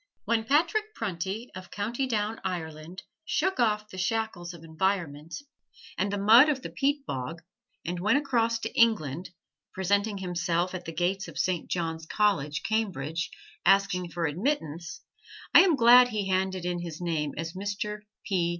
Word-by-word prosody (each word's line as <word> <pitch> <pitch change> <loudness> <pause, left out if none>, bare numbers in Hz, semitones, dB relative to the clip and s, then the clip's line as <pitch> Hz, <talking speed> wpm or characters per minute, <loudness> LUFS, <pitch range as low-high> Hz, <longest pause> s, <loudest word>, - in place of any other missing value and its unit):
When 225 -1 +1
Patrick 345 - +1
Prunty 200 +3 -4
of 185 0 -9
County 235 +6 -2
Down, 220 -2 -1
Ireland, 165 -1 -5 0.2
shook 360 +1 0
off 215 -3 +2
the 185 - -8
shackles 190 -3 -2
of 170 -2 -12
environment, 165 -2 -2 0.6
and 195 +1 -1
the 205 - -1
mud 225 +9 +7
of 270 -3 -1
the - - -6
peat 280 +1 0
bog, 145 +6 -5 0.4
and 175 +1 -3
went 215 +9 +3
across 235 -5 +1
to 225 - -4
England, 175 - +2 0.5
presenting 200 +2 +1
himself 175 -1 -1
at 180 -1 -6
the 165 - -5
gates 180 +4 -1
of - - -10
Saint 180 -3 -1
John's 165 -2 -3
College, 155 -10 +1
Cambridge, 170 -7 -1 0.3
asking 195 -2 +3
for 170 0 -2
admittance, 165 - -2 0.5
I - - +10
am 365 -5 +4
glad 245 0 +8
he 210 -5 -2
handed 190 -1 0
in 175 0 -1
his 170 -2 -6
name 160 -4 -2
as 165 +1 -4
Mr. 205 +2 -4 0.3
P. 180 -4 +1
190 Hz, 160 wpm, -28 LUFS, 170-225 Hz, 0.6 s, I